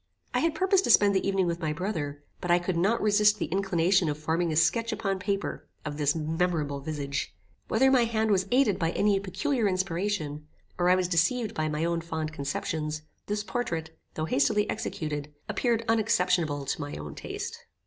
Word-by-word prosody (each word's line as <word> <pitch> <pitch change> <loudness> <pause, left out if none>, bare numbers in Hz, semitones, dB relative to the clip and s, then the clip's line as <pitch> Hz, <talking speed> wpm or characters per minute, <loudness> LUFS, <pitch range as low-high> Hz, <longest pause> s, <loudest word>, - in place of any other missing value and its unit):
I - - +2
had 330 -1 +1
purposed 380 0 +3
to - - -2
spend 205 -3 +6
the 190 - +1
evening 195 -1 +2
with 170 -1 -1
my 155 -3 -1
brother, 150 -5 -3 0.2
but 180 - -5
I 175 - +6
could 175 0 -2
not 200 +8 +2
resist 210 0 +4
the - - -1
inclination 185 -1 +2
of 145 - -2
forming 160 +2 0
a - - -1
sketch 230 +9 +2
upon 195 -3 -1
paper 200 +1 -3 0.2
of 145 -1 -4
this 145 0 +2
memorable 160 -2 -1
visage. 145 -1 -4 0.3
Whether 265 +4 +4
my 250 -3 +5
hand 220 -1 0
was 190 -1 +2
aided 250 -6 +3
by 165 - +1
any 205 -1 +2
peculiar 205 +5 0
inspiration, 185 -5 -2 0.3
or 175 0 +3
I 180 - +6
was 185 -1 +1
deceived 210 +7 +1
by 155 -6 -1
my 155 +2 -1
own 170 0 0
fond 160 -2 -4
conceptions, 150 +2 -3 0.2
this 205 0 -1
portrait, 165 -10 -3 0.2
though 155 - -1
hastily 160 +8 +2
executed, 150 -7 -4
appeared 230 -2 0
unexceptionable 180 -9 +2
to 140 - -2
my 145 0 -5
own 75 -1 -7
taste. - - -6
180 Hz, 190 wpm, -28 LUFS, 155-210 Hz, 0.3 s, spend